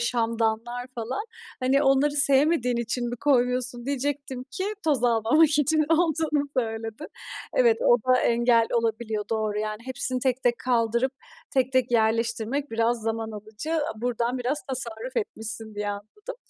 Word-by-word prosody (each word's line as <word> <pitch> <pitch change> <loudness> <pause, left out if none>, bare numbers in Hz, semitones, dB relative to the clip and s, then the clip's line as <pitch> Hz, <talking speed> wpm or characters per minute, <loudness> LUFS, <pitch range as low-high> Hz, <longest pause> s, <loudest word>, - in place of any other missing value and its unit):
şamdanlar 230 +1 -1
falan. 245 - -3 0.4
Hani 270 +3 +3
onları 270 +2 +4
sevmediğin 275 -3 +3
için 235 +1 -2
mi 245 - -4
koymuyorsun?" 250 -2 +1
diyecektim 275 -2 -3
ki 375 +8 -3 0.2
toz 280 -6 +2
almamak 240 +7 +4
için 310 +2 +3
olduğunu 315 -3 +1
söyledin. 225 +3 -3 0.5
Evet, 475 -2 +4
o - - +6
da 255 0 +6
engel 235 -1 +3
olabiliyor, 220 -2 -1
doğru. 215 -2 -1
Yani 215 0 -3
hepsini 255 0 -2
tek 260 -1 0
tek 240 -1 +2
kaldırıp, 235 +1 +1 0.4
tek 260 -1 +1
tek 255 -2 +2
yerleştirmek 230 +4 +1
biraz 230 +1 +1
zaman 225 0 -2
alıcı. 220 +10 -4 0.2
Buradan 240 +2 -1
biraz 265 +5 -1
tasarruf 250 -1 -5
etmişsin 220 -1 -4
diye 205 0 -3
anladım. 215 - -8
245 Hz, 140 wpm, -26 LUFS, 225-275 Hz, 0.5 s, o